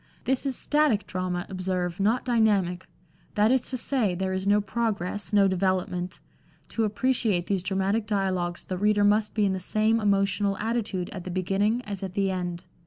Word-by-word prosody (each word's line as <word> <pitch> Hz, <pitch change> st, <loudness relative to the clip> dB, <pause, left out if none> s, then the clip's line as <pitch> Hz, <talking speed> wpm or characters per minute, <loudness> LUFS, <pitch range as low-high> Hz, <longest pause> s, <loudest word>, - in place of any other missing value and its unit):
This 265 Hz, +2 st, +1 dB
is 265 Hz, -, -1 dB
static 295 Hz, -8 st, +2 dB
drama, 185 Hz, -1 st, -3 dB
observe, 185 Hz, -2 st, -2 dB
not 220 Hz, +5 st, +1 dB
dynamic; 205 Hz, -7 st, +1 dB, 0.5 s
that 210 Hz, +2 st, +4 dB
is 260 Hz, -1 st, +3 dB
to 255 Hz, -, -2 dB
say, 230 Hz, -7 st, 0 dB
there 190 Hz, +1 st, -2 dB
is 190 Hz, +1 st, -2 dB
no 205 Hz, +1 st, +5 dB
progress, 205 Hz, -2 st, -2 dB
no 200 Hz, -2 st, +5 dB
development; 185 Hz, -1 st, -1 dB, 0.5 s
to 225 Hz, -, 0 dB
appreciate 215 Hz, -4 st, +1 dB
these 195 Hz, -1 st, 0 dB
dramatic 195 Hz, +3 st, 0 dB
dialogues 185 Hz, -4 st, -1 dB
the 185 Hz, -1 st, -4 dB
reader 205 Hz, 0 st, +3 dB
must 210 Hz, +1 st, +2 dB
be 210 Hz, -2 st, +3 dB
in 195 Hz, -, +1 dB
the 190 Hz, -, -2 dB
same 215 Hz, +4 st, +1 dB
emotional 200 Hz, -1 st, +1 dB
attitude 210 Hz, -5 st, -2 dB
at 190 Hz, -3 st, -6 dB
the 185 Hz, -, -6 dB
beginning 195 Hz, +6 st, 0 dB
as 200 Hz, -4 st, -5 dB
at 190 Hz, -2 st, -5 dB
the 195 Hz, -1 st, +1 dB
end. 175 Hz, -2 st, -4 dB
200 Hz, 175 wpm, -26 LUFS, 185-215 Hz, 0.5 s, no